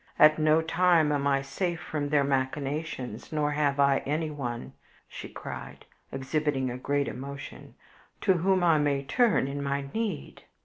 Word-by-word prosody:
At 155 +1 +6
no 155 +1 +4
time 165 -2 +3
am 140 -1 +1
I 135 -1 +2
safe 170 +5 -2
from 145 -4 -3
their 145 -1 +3
machinations, 135 -2 -2
nor 150 -1 0
have 145 -1 0
I 140 -1 +4
anyone," 145 -5 -3 0.6
cried - - -8
she, - - -14
exhibiting 135 -1 -1
a 125 - -5
great 140 +1 0
emotion, 140 +2 -8 0.5
"to 190 - +4
whom 185 +1 +2
I 165 -3 +4
may 140 -2 +1
turn 205 - +2
in 140 +1 -4
my 140 0 -2
need. 215 -10 -3
145 Hz, 150 wpm, -28 LUFS, 140-155 Hz, 0.6 s, At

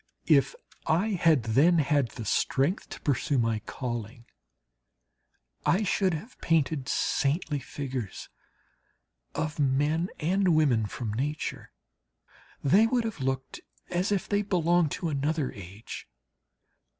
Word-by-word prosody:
If - - +4 0.3
I 180 +8 +2
had 165 - +3
then 140 +11 +4
had 145 -4 +2
the 115 - -8
strength 140 - 0
to - - -9
pursue 140 0 0
my 115 -2 +1
calling, 120 -1 -5 1.4
I 195 +5 +2
should 190 -3 +1
have 220 +11 -10
painted 150 -4 +1
saintly 145 +1 0
figures 130 -6 -5 1.1
of 155 0 -3
men 145 +5 +1
and 180 +2 +2
women 125 -9 +3
from 110 0 -4
nature. 145 +6 -3 0.9
They 200 +11 +5
would 245 0 +1
have 225 -7 -4
looked 130 0 -3 0.3
as 180 +3 0
if 200 -3 0
they 205 0 +1
belonged 175 -4 +2
to 175 -3 -2
another 145 0 -1
age. 100 +3 -9
150 Hz, 120 wpm, -28 LUFS, 130-175 Hz, 1.4 s, They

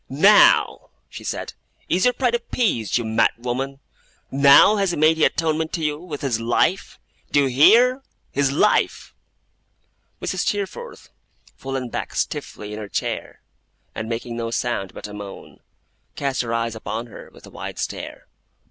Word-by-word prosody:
'Now,' 195 +10 +5 0.2
she - - -10
said, - - -4 0.3
'is 185 +5 +1
your 250 - +4
pride 250 -3 +1
appeased, 225 - 0
you 120 - -2
madwoman? 125 +4 -1 0.5
Now 140 +9 +6
has 195 -2 +1
he 175 - -2
made 155 +2 +3
atonement 160 0 +1
to 165 - -2
you 150 -1 -1
with 160 -4 -7
his 125 -5 -1
life! 120 +11 0 0.3
Do 145 - +4
you 135 - +1
hear? 240 - +5 0.3
His 140 -1 +1
life!' 210 +9 +1 1.1
Mrs. - - -3
Steerforth, 210 - -4 0.5
fallen 135 -2 -5
back - - -5
stiffly 105 0 -4
in 105 - -6
her 105 -2 -7
chair, - - -4 0.5
and 110 - -5
making 115 0 -4
no 115 -1 -3
sound 115 -5 -3
but - - -7
a 105 - -11
moan, 100 -1 -10 0.6
cast 140 -1 -1
her 115 -2 -4
eyes 115 -1 -1
upon 110 +1 -5
her 120 - -12
with - - -16
a - - -14
wide - - -7
stare. - - -6
135 Hz, 155 wpm, -22 LUFS, 115-175 Hz, 1.1 s, Now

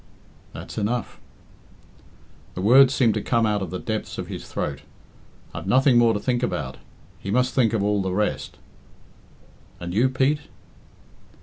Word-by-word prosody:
"That's - - -7
enough." 115 +3 -2 1.4
The 90 - -4
words 130 +5 +7
seemed 120 -5 +3
to 105 - -2
come 115 0 +1
out 105 -1 0
of 95 - -4
the 90 - -4
depths 110 +1 -4
of - - -5
his - - -7
throat. - - -4 0.7
"I've - - -7
nothing 130 -1 +4
more 115 -2 +4
to - - -1
think 120 +2 -1
about. 70 - -3 0.4
He 100 - -7
must 125 +4 +1
think 120 -4 +3
of 110 -3 0
all 105 0 +1
the 95 - -2
rest." 105 +3 -2 1.2
"And 85 0 -6
you, 120 +6 +3
Pete?" 135 +3 +1
115 Hz, 160 wpm, -23 LUFS, 100-125 Hz, 1.4 s, words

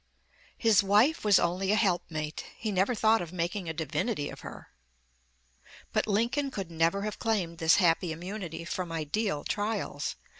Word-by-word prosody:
His 225 -4 +5
wife 210 +11 +3
was 205 -2 +6
only 185 +3 +1
a - - +4
helpmate; 175 -7 -1
he 220 -2 -3
never 195 +6 +1
thought 220 +1 +3
of 170 -2 -6
making 180 +1 -2
a - - 0
divinity 155 - -2
of - - -10
her." - - -10 1.2
But - - +1
Lincoln 235 +7 +1
could 195 -9 -6
never 165 +5 +1
have 210 0 -4
claimed 185 -7 -1
this 160 +1 +5
happy 175 -2 +2
immunity 175 0 -6
from 180 0 -4
ideal 165 +2 -1
trials. 205 -9 -2
190 Hz, 155 wpm, -29 LUFS, 165-215 Hz, 1.2 s, was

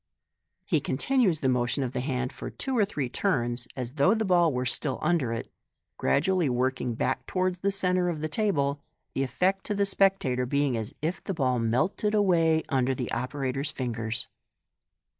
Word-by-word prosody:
He - - +2
continues 240 - +1
the 135 - +1
motion 125 +1 +1
of 125 - -3
the - - -1
hand 130 -1 -2
for - - -6
two 265 -2 -3
or 215 -4 +4
three 145 -10 -3
turns, 120 -6 -1
as 125 -2 -4
though 155 - +3
the 220 -1 0
ball 175 -3 +4
was 125 -1 0
still 135 -4 -1
under 160 -9 +1
it, 115 - -4 0.5
gradually 165 - +2
working 125 -1 0
back 130 - -1
towards 185 -1 0
the 200 - +1
centre 180 -2 +1
of 165 -3 -3
the 155 - -2
table, 145 -7 0 0.3
the - - -1
effect 185 +9 0
to 210 - -1
the 200 0 +2
spectator 190 -11 +2
being 140 -1 +1
as 110 +1 -4
if 165 +4 -2
the 195 - -3
ball 130 -5 +1
melted 155 - +1
away 165 -6 +3
under 130 -1 +1
the 125 -1 -4
operator*! 130 +2 -2
fingers. 120 -5 -2
140 Hz, 180 wpm, -27 LUFS, 125-185 Hz, 0.5 s, or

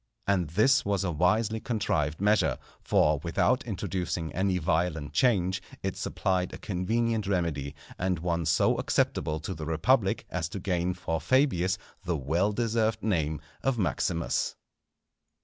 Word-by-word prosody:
And 95 -5 +1
this 110 - +4
was 100 -1 0
a 90 - 0
wisely 105 +7 +2
contrived 80 -11 -1
measure, 105 +2 +3 0.2
for, 75 -1 +3
without 125 - +1
introducing 90 -6 -3
any 95 0 +1
violent 80 -3 -1
change, 95 -2 +2 0.2
it 95 -1 -2
supplied 90 -1 -1
a - - -7
convenient 110 +3 -1
remedy, 80 -7 -1 0.2
and 95 0 0
one 85 -1 -1
so - - +3
acceptable 80 0 0
to 95 - -4
the 80 -3 -6
republic 95 +7 +2
as 85 -3 -2
to 100 - -5
gain 90 -1 -1
for 80 -4 -3
Fabius 95 - +2 0.3
the 85 -3 -1
well 85 +9 +1
deserved 115 0 0
name 80 -8 0 0.2
of 135 -2 0
Maximus. 85 -3 0
90 Hz, 140 wpm, -28 LUFS, 80-105 Hz, 0.3 s, this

